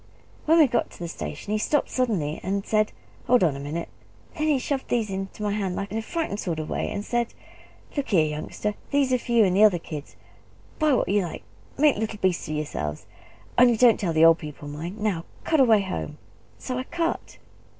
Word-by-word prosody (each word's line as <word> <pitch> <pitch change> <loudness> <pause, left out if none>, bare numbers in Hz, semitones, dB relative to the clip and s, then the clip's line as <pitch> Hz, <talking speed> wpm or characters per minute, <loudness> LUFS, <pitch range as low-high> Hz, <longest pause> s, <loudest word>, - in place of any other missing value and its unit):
When 325 +2 +6
we 320 - +8
got 245 - 0
to - - -14
the 170 - -5
station 205 +4 -5
he 215 - +1
stopped 295 +6 +1
suddenly, 195 - 0
and 195 +1 -2
said, 215 -1 +2 0.4
'Hold 245 -4 +5
on 155 -5 +2
a - - -6
minute!' 150 +4 -4 0.5
Then 310 -1 -1
he 300 -3 +3
shoved 265 +1 -2
these 225 -4 0
into 195 +2 -5
my 205 - 0
hand 195 -3 -2
in - - -4
a - - -1
frightened 310 - -3
sort 170 -6 -2
of 155 -1 -5
way; - - -1
and 205 - -4
said, 240 -1 -1 0.6
'Look 285 -2 -1
here, 170 -7 +4
youngster! 155 +7 -3 0.2
These 280 -2 +2
are 250 - +3
for 240 - -7
you 230 -3 +6
and 185 -1 +1
the 205 - +6
other 205 -5 +6
kids. 155 -3 -8 0.6
Buy 305 -2 +3
what - - +2
you 205 +1 +2
like 175 -4 -6 0.3
make 295 0 +4
little 215 0 -3
beasts 185 -3 0
of 155 - -3
yourselves 75 - -4 0.5
only 245 -2 +6
don't 240 -1 +5
tell 180 -5 0
the 160 0 +5
old 165 0 +6
people, 150 -1 -8
mind! 165 +7 -6
Now 205 -6 -1 0.2
cut 315 - +2
away 225 -6 +6
home!' 190 - -4 0.4
So 255 -1 -4
I - - -2
cut." 335 +2 -3
210 Hz, 215 wpm, -25 LUFS, 170-250 Hz, 0.6 s, we